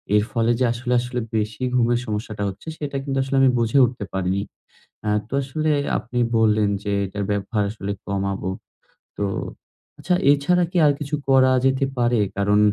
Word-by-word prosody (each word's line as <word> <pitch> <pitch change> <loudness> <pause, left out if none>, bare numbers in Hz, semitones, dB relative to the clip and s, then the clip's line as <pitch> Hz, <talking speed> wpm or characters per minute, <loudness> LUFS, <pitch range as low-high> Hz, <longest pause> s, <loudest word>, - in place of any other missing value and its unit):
এর 105 - +4
ফলে 115 -1 +1
যে 130 - +3
আসলে, 120 +1 -2
আসলে, 125 +1 -3 0.2
বেশি 110 +3 -2
ঘুমের 120 -1 +3
সমস্যাটা 105 -1 -4
হচ্ছে 95 +10 -11
সেটা 145 -2 -5
কিন্তু 135 -1 -2
আসলে 135 +1 -3
আমি 135 - +6
বুঝে 115 +3 +1
উঠতে 120 -3 -4
পারিনি। 95 +1 0 0.6
অ্যা 105 - +1 0.2
তো - - -8
আসলে 155 +4 -1 0.3
আপনি 125 0 -4 0.2
বললেন 110 -2 +3
যে 100 - -2
এটার 100 +2 -4
ব্যবহার 105 +1 -1
আসলে 100 -2 -5
কমাবো। 100 -1 -2 0.7
তো - - -1 0.8
আচ্ছা, 180 - 0 0.2
এছাড়া 150 +5 +3
কি 180 - -1
আর 145 - +6
কিছু 150 0 -2
করা 130 -1 +5
যেতে 135 +1 +2
পারে? 120 -1 +2 0.2
কারণ 105 +1 +3
120 Hz, 170 wpm, -22 LUFS, 105-135 Hz, 0.8 s, আমি